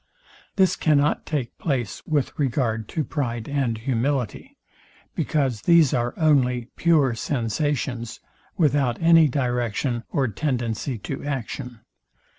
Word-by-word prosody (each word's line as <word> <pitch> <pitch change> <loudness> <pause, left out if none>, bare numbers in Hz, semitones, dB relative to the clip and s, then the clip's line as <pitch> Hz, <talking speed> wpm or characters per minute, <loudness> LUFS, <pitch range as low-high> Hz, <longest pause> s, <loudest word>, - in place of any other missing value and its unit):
This 190 -2 +3
cannot 150 -2 +2
take 140 -6 -3
place 130 - -2
with 145 -4 0
regard 115 -5 0
to 155 - -1
pride 120 -7 -3
and 135 -5 -1
humility; 125 +1 -2 0.6
because 135 -8 0
these 170 -5 +5
are 120 -1 -1
only 130 -6 +2
pure 155 -7 +3
sensations, 120 0 -2 0.4
without 140 -7 +2
any 165 -1 +6
direction 120 -2 -1
or 135 -2 +1
tendency 120 0 -2
to 135 +6 -6
action. 125 -3 -5
130 Hz, 110 wpm, -24 LUFS, 120-145 Hz, 0.6 s, any